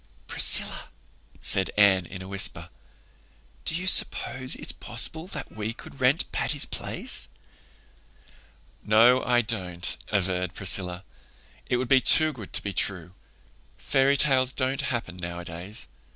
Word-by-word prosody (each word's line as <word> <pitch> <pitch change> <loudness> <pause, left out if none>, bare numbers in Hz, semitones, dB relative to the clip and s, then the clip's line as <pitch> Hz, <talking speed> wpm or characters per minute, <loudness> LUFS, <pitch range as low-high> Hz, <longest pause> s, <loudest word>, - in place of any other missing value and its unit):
"Priscilla," - - +2 0.5
said 95 -1 +4
Anne, 95 -4 +3
in 95 -1 -10
a - - -11
whisper, 100 0 -1 1.0
"do - - -3
you 180 +2 -4
suppose 130 -7 +3
it's - - -5
possible 160 +8 -1
that 145 -7 -8
we 110 +1 -6
could 135 +3 -14
rent 130 +5 +2
Patty's 145 +1 -1
Place?" - - -1 1.6
"No, 120 +4 +3
I 120 -1 +1
don't," 90 -6 -5 0.2
averred 90 -3 -2
Priscilla. 90 -1 0 0.6
"It 125 - -1
would 130 0 -4
be 130 +1 +3
too 155 +3 +6
good 110 -7 -12
to - - -1
be 100 - -5
true. 90 -3 -2 0.6
Fairy 135 +1 0
tales 130 -3 +3
don't 130 +1 -2
happen 115 -8 -5
nowadays. 85 +3 -6
110 Hz, 130 wpm, -24 LUFS, 95-130 Hz, 1.6 s, too